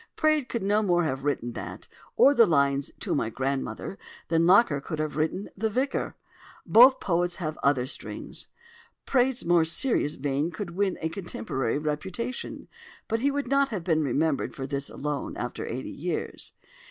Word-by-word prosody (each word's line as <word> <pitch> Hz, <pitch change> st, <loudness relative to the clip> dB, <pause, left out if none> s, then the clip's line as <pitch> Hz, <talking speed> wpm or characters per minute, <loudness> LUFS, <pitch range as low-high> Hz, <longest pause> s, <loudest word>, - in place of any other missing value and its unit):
Praed 310 Hz, -4 st, +2 dB
could 235 Hz, -4 st, -2 dB
no 205 Hz, +2 st, +2 dB
more 175 Hz, -4 st, +2 dB
have 135 Hz, -3 st, -2 dB
written 125 Hz, -5 st, -1 dB
that, -, -, -7 dB, 0.3 s
or 280 Hz, -, +6 dB
the 235 Hz, -5 st, +6 dB
lines 140 Hz, -3 st, +2 dB
"To -, -, -1 dB
my 115 Hz, -, 0 dB
Grandmother," 135 Hz, -, -3 dB, 0.3 s
than 165 Hz, 0 st, +3 dB
Locker 180 Hz, -7 st, +5 dB
could 155 Hz, -, -5 dB
have 155 Hz, 0 st, -2 dB
written 160 Hz, +6 st, -1 dB
"The 220 Hz, +3 st, -1 dB
Vicar." 260 Hz, +6 st, -1 dB, 0.5 s
Both 255 Hz, +4 st, +7 dB
poets 175 Hz, -1 st, 0 dB
have 155 Hz, -3 st, -4 dB
other 140 Hz, -3 st, +2 dB
strings. 130 Hz, -, -6 dB, 0.6 s
Praed's 260 Hz, -1 st, +1 dB
more 170 Hz, -1 st, +4 dB
serious 160 Hz, -, +1 dB
vein 145 Hz, +3 st, -1 dB
could 175 Hz, +1 st, -6 dB
win 190 Hz, +1 st, 0 dB
a 160 Hz, -, -1 dB
contemporary 135 Hz, -, -3 dB
reputation: 155 Hz, -, -4 dB, 0.4 s
but 225 Hz, +1 st, 0 dB
he 275 Hz, +4 st, +2 dB
would 285 Hz, -1 st, -2 dB
not 275 Hz, +1 st, +3 dB
have 205 Hz, -8 st, -4 dB
been 160 Hz, -2 st, +2 dB
remembered 145 Hz, +1 st, 0 dB
for 135 Hz, -, -4 dB
this 140 Hz, 0 st, -3 dB
alone, 145 Hz, 0 st, -4 dB
after 125 Hz, -, -4 dB
eighty 130 Hz, +3 st, -5 dB
years. 175 Hz, +4 st, -4 dB
165 Hz, 165 wpm, -27 LUFS, 140-215 Hz, 0.6 s, Both